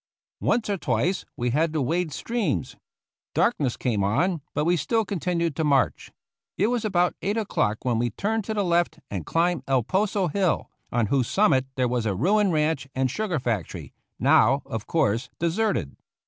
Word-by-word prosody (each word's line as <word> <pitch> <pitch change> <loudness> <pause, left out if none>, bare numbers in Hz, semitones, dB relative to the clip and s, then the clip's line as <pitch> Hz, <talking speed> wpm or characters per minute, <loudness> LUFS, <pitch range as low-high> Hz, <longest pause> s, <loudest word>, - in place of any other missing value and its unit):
Once 240 - +1
or 200 -2 -1
twice 145 - 0
we 120 0 0
had 155 +5 +1
to 155 - -1
wade 160 +5 0
streams. 230 - -2 0.6
Dark 240 - +2
ness 130 -5 -1
came 110 -6 0
on, 150 - +1
but 150 - +1
we 175 +1 +3
still 220 +8 0
continued 170 -5 -1
to 160 - -1
march. 140 -3 +1 0.5
It 210 +5 +2
was 240 -2 -1
about 180 -4 +2
eight 205 +3 -1
o'clock 110 - -1
when 120 -3 +1
we 120 +1 +1
turned 220 - -1
to 220 - -3
the 205 - +1
left 175 -2 +1
and 95 -6 -4
climbed 170 -2 +1
El 135 -3 +2
Poso 195 - 0
hill, 185 +2 0 0.2
on 120 -2 +2
whose 130 -4 +2
summit 135 -11 +3
there 130 -1 +1
was 120 -2 -1
a 100 - 0
ruined 195 - +2
ranch 150 -3 0
and 130 -1 +1
sugar 205 -1 -1
factory, 115 - -3 0.2
now, 135 +6 +4
of 115 -1 -5
course, 125 -5 +1
deserted. 170 - 0
160 Hz, 180 wpm, -25 LUFS, 125-195 Hz, 0.6 s, now